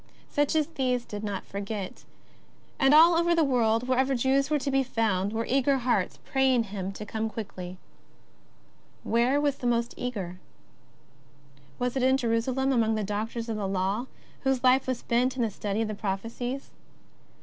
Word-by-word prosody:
Such 290 +1 +1
as 310 -1 +3
these 255 -5 -1
did 210 0 -6
not 200 -2 -4
forget. 200 -1 -6 0.7
And 270 -1 +5
all 330 +3 +8
over 340 +1 +3
the 330 - +4
world, 240 -3 +2
wherever 260 +1 +2
Jews 265 +3 +2
were 305 - +2
to 280 0 -2
be 270 0 +3
found, 215 -6 0
were 225 +1 -2
eager 270 +1 +2
hearts 250 -1 0
praying 265 -3 +2
Him 195 -2 -5
to 210 - -7
come 220 +1 -3
quickly. 185 -5 -7 1.3
Where 240 +5 +2
was 285 -1 +1
the 245 - -3
most 235 0 +1
eager? 195 -8 -4 1.4
Was 250 0 -1
it 265 - 0
in 260 +1 +4
Jerusalem 255 +2 0
among 225 -3 +2
the 215 - -1
doctors 220 +3 -3
of 225 -2 -2
the 200 -2 -2
Law, 195 +6 -1 0.3
whose 265 -2 0
life 260 +1 +4
was 255 -2 0
spent 250 +2 0
in 250 - 0
the 225 - 0
study 205 +2 -2
of - - -2
the 215 - -3
prophecies 230 +6 -4
240 Hz, 170 wpm, -27 LUFS, 215-265 Hz, 1.4 s, all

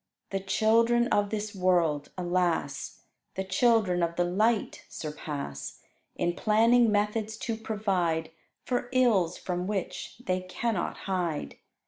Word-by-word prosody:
The 195 - 0
children 230 +4 +3
of 205 0 +2
this 215 0 -3
world, 175 -6 +1
alas! 175 -5 -1 0.3
The 190 - -1
children 190 -2 +2
of 170 0 0
the 175 - +2
light 210 +5 +1
surpass, 145 - -6 0.4
In 175 - 0
planning 230 +4 +4
methods 210 +1 0
to 230 0 -3
provide 190 -8 -1 0.3
For 245 -1 -1
ills 220 -10 +3
from 180 0 -3
which 200 -3 -4
they 185 0 0
cannot 185 +2 -2
hide. 175 - -2
190 Hz, 120 wpm, -28 LUFS, 175-220 Hz, 0.4 s, planning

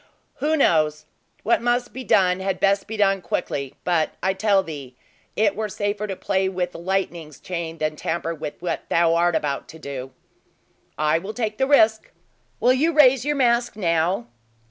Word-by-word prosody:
"Who 305 +3 +1
knows! 155 - +2 0.4
What 230 - +2
must 240 +1 0
be 260 - -6
done, 185 -5 +3
had 190 0 -2
best 200 0 +2
be 220 0 -5
done 195 -2 +2
quickly; 140 -6 -3
but 170 -3 0
I 190 - +2
tell 195 0 +2
thee 140 -7 -8 0.4
it 205 -2 +2
were 215 0 -3
safer 205 +1 -2
to 195 - -4
play 190 0 0
with 180 -1 -2
the - - -10
lightning's 170 -4 -3
chain 170 -2 -5
than 155 -1 -2
tamper 165 +2 -3
with 150 -2 -7
what 175 - -3
thou 165 -1 +3
art 170 0 +2
about 140 -2 -2
to 160 - -12
do." 135 -4 -7 0.9
"I 155 +2 +2
take 215 +3 -4
the 265 - +2
risk! 220 -6 +4 0.5
Will 250 - +4
you 310 +6 +1
raise 270 -4 +5
your 295 0 +1
mask 240 -4 +2
now?" 170 - 0
190 Hz, 175 wpm, -23 LUFS, 165-220 Hz, 0.9 s, raise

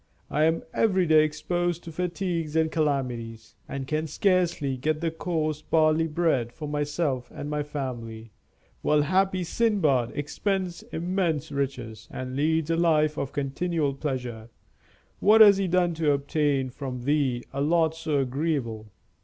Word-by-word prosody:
I 150 +2 +3
am 160 +1 +1
every 190 -5 +2
day 155 -1 +6
exposed 175 +3 -1
to 165 - -8
fatigues 170 -2 -2
and 160 0 +2
calamities, 125 -7 -2
and 135 -1 -4
can 155 +3 -1
scarcely 175 -5 +1
get 155 +4 -1 0.2
coarse 155 -3 -1
barley 155 0 +2
bread 150 -7 0
for 150 +3 -7
myself 145 -3 -2
and 145 - -6
my 150 0 -1
family, 120 -6 -6 0.5
while 150 -1 +3
happy 185 +3 +1
Sindbad 160 - +1
expends 180 +4 -2
immense 165 -3 -1
riches, 130 -6 -4
and 130 0 -6
leads 160 +2 +1
a 165 - +1
life 155 -3 +3
of 140 - -3
continual 145 +1 -1
pleasure. 125 -5 -4 0.7
What 215 +2 +5
has 205 -2 +9
he 195 -1 0
done 175 -1 +2
to 155 -2 +2
obtain 140 -2 0
from 130 -2 -6
Thee 135 -3 +1
a 140 - -2
lot 160 +1 +2
so 160 -2 -2
agreeable? 130 -5 -1
155 Hz, 145 wpm, -26 LUFS, 135-170 Hz, 0.7 s, has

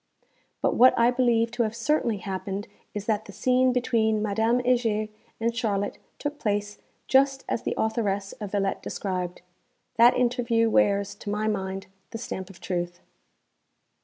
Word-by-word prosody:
But - - +3
what 255 +1 +6
I 235 +1 +5
believe 235 -2 +2
to 240 0 -1
have 220 -2 0
_certainly 230 -3 0
happened 195 +2 -4 0.3
is 205 -1 -4
that 215 -1 0
the - - -10
scene 255 +4 +2
between 230 -3 +1
Madame 220 +3 +1
Heger 235 -4 +1 0.3
and 230 +1 0
Charlotte 205 -4 -1 0.2
took 290 0 -4
place 205 -1 -2 0.3
just 270 0 +3
as - - -1
the - - -2
authoress 205 -3 -1
of 205 -2 -5
'Villette' 195 -1 0
described_. 180 -3 -4 0.6
That 235 +1 +6
interview 235 -2 +2
wears, 200 -5 +2
to 205 - -8
my 210 +1 -1
mind, 195 -2 -2 0.2
the - - -6
stamp 190 -5 -6
of 190 - -14
truth. 175 -1 -3
220 Hz, 155 wpm, -26 LUFS, 200-240 Hz, 0.6 s, what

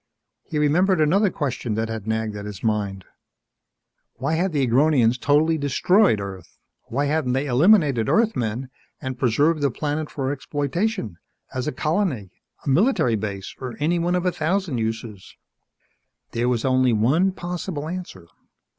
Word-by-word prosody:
He 155 - -4
remembered 170 +5 +3
another 190 +7 +3
question 130 -8 -3
that 110 +1 -1
had 110 -2 -6
nagged 110 -1 -1
at 105 0 -6
his 100 -3 -8
mind: 100 -4 -1 1.1
Why 140 +5 -2
had 175 +3 +1
the 140 -4 +1
Agronians 125 -1 +3
totally 155 +4 +2
destroyed 145 - +3
Earth? 95 -3 -8 0.3
Why 140 +5 -1
hadn't 145 -3 0
they 135 +2 0
eliminated 140 - +4
Earthmen 130 - 0 0.3
and 130 -3 -5
preserved 145 +6 +2
the 140 - +3
planet 150 +4 -3
for 135 -2 -2
exploitation 145 - -2 0.3
as 130 +2 -3
a - - 0
colony, 155 - -1 0.3
a - - -1
military 155 - +3
base, 100 -2 -5 0.2
any 170 +4 +1
one 175 +2 +1
of 180 0 -1
a 180 - +3
thousand 165 -4 -1
uses? 110 -3 -5 1.0
There 120 +2 0
was 120 -1 0
only 130 -2 +3
one 140 - +3
possible 175 -4 -5
answer. 165 - -7
140 Hz, 145 wpm, -23 LUFS, 115-165 Hz, 1.1 s, eliminated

